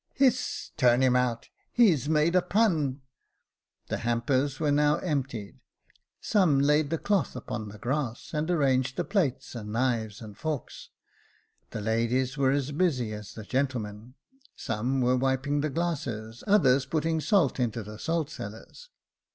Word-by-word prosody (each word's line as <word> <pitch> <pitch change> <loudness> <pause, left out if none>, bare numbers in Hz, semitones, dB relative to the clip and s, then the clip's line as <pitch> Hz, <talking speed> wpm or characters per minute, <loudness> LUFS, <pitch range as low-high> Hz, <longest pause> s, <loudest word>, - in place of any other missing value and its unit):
" - - -40
Hiss! 255 -2 +1
turn 125 +1 +4
him 125 -1 +4
out! 125 -2 0 0.2
he's 170 - +3
made 160 +2 +3
z.punP 175 - +2 0.8
The - - -3
hampers 130 +4 0
were 150 -2 +1
now 150 +1 +3
emptied 135 - -3
j - - -31 0.6
some 180 -10 +3
laid 150 +1 +3
the 165 - 0
cloth 200 -3 0
upon 110 -3 -5
the 105 - -10
grass, 125 +3 -3
and 155 +2 -1
arranged 130 -6 +2
the - - +1
plates, 180 - -1
and 105 -3 -6
knives 115 -3 -1
and 110 -3 -10
forks. 150 +3 -5 0.8
The 105 - -5
ladies 115 +5 0
were 135 -2 +2
as 140 +1 0
busy 140 -9 0
as 105 -1 -8
the 110 - -7
gentlemen 120 -2 -3 0.2
— 270 +2 -29
some 120 +5 -1
were 125 +1 +3
wiping 135 +2 0
the 155 - -1
glasses, 130 -9 -3
others 140 -10 +4
putting 160 +2 0
salt 175 - +2
into 115 -2 -1
the 105 +1 -10
salt 165 -2 -1
cellars. 110 - -9
135 Hz, 155 wpm, -28 LUFS, 120-155 Hz, 0.8 s, turn